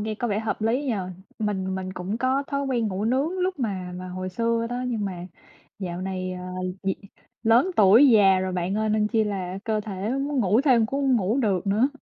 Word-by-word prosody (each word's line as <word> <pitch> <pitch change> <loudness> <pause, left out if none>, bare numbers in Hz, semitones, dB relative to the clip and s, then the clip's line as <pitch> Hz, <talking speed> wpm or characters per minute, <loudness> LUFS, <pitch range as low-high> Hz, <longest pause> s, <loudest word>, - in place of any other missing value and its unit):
nghe 215 +1 -2
có 240 +3 -2
vẻ 205 -1 0
hợp 220 0 -3
lý 240 +6 +1
nhỉ. 255 -5 0 0.4
Mình 190 -3 -2
mình 185 0 -4
cũng 190 +4 -4
có 260 +3 +1
thói 280 0 -2
quen 240 -4 0
ngủ 195 +1 -3
nướng 275 +10 0
lúc 365 -3 -1
mà 190 -7 -3
mà 185 0 -7
hồi 185 +1 -5
xưa 230 +4 0
đó, 245 +1 -2
nhưng 225 -4 -2
mà 180 -3 -5 0.5
dạo 180 -3 -4
này, 185 -1 -3
ờ, 180 0 -7 0.4
gì 195 -1 0 0.5
lớn 235 +10 +4
tuổi 215 +8 +7
già 200 -5 +6
rồi 185 0 -2
bạn 180 +1 -1
ơi 215 0 0
nên 215 0 +2
chi 220 -1 +2
là 190 -3 -3
cơ 215 -1 0
thể 200 -1 -5
nó 265 - -1
muốn 280 -1 -1
ngủ 210 +2 +3
thêm 250 -6 +4
cũng 275 +4 -2
hông 265 -2 +3
ngủ 215 +4 0
được 200 -7 0
nữa. 215 +7 +3
215 Hz, 230 wpm, -25 LUFS, 190-245 Hz, 0.5 s, tuổi